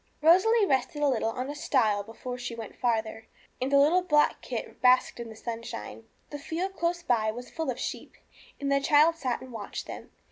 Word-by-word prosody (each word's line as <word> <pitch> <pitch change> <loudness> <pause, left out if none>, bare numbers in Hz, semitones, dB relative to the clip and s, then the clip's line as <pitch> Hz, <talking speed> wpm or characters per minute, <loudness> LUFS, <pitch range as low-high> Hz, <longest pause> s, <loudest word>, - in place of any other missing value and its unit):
Rosalie 400 +7 +5
rested 295 +1 0
a - - +4
little 235 -4 +1
on 255 +3 -4
a 290 - -4
stile 230 -8 +1
before 225 +4 -7
she 240 -1 -5
went 225 -2 -8
farther, 225 -2 -1 0.3
and 260 +2 -1
the 280 - +5
little 310 +6 +5
black 300 -5 +2
kit - - -6
basked 255 -1 +4
in 235 -1 -6
the 220 - -10
sunshine. 230 0 -7 0.3
The 290 - -5
field 355 +7 -4
close 345 0 -1
by 225 -7 +1
was 245 +3 -7
full 320 -4 -3
of 250 - -2
sheep, - - -5 0.4
and 280 0 -2
the 275 0 +3
child 305 +3 +5
sat 255 -7 -2
and 260 - -10
watched 210 -3 -6
them. - - -9
260 Hz, 205 wpm, -28 LUFS, 230-310 Hz, 0.4 s, Rosalie